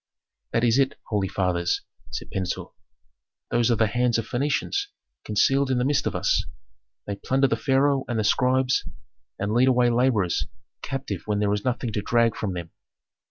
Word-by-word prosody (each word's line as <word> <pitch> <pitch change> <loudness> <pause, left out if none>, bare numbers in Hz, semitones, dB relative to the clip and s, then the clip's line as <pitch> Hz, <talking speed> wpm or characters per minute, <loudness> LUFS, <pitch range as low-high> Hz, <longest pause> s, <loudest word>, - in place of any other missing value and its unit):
"That 115 - +1
is 120 +2 +4
it, 135 0 +2
holy 105 -3 0
fathers," 90 -2 0 0.3
said - - -6
Pentuer. 95 -1 -3 0.8
"Those 120 0 +2
are 120 - +4
the 110 0 +3
hands 120 +2 +1
of 115 - -3
Phœnicians 145 - -1 0.4
concealed 135 +6 +2
in 130 - +1
the 125 - +1
midst 145 +1 +1
of - - -2
us; - - +1 0.6
they 100 -1 -4
plunder 135 +6 +1
the 115 - +1
pharaoh 135 +2 +2
and 120 - -2
the 110 - +1
scribes, 130 +4 +2 0.5
and 100 +2 -2
lead 125 +3 +4
away 125 -2 +4
laborers 115 -7 +1 0.3
captive 130 -9 -4
when 105 -1 0
there 105 0 +1
is 105 - -2
nothing 125 -2 -2
to 105 - -1
drag 115 +1 +2
from 100 -4 -3
them." 85 -2 -6
120 Hz, 175 wpm, -25 LUFS, 105-130 Hz, 0.8 s, is